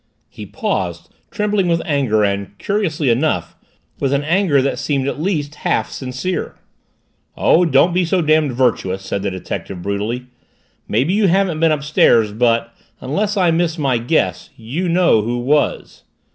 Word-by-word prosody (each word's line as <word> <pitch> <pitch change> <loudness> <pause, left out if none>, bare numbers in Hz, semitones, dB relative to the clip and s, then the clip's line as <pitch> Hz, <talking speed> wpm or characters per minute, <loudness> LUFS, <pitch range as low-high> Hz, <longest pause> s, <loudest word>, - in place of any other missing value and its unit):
He 105 -4 -10
paused, 90 -3 -3 0.2
trembling 210 -3 0
with 170 -1 +2
anger 130 -8 +1
and, 100 0 -2
curiously 160 - 0
enough, 140 +7 0 0.4
with 135 0 0
an 140 +1 +1
anger 170 -2 +2
that 135 -1 -1
seemed 140 -2 -1
at 140 - -3
least 155 -5 -1
half - - 0
sincere. 130 +8 -4 0.8
"Oh, 180 +2 +4
don't 165 +3 +3
be 180 +1 +2
so 180 +2 +1
damned 155 -2 +2
virtuous!" 115 -7 0
said 95 +1 -3
the 100 - -1
detective 95 -1 -6
brutally. 105 +5 -3 0.6
"Maybe 130 - +1
you 205 0 +3
haven't 185 -3 +1
been 165 0 +3
upstairs 140 -7 +3
but 115 +1 +1 0.3
unless 205 +11 -2
I 180 -3 +3
miss 165 0 0
my 135 -6 +1
guess, 115 - -1
you 145 +11 -3
know 170 -10 +3
who 120 +3 -2
was!" 140 +5 -1
140 Hz, 155 wpm, -18 LUFS, 115-170 Hz, 0.8 s, Oh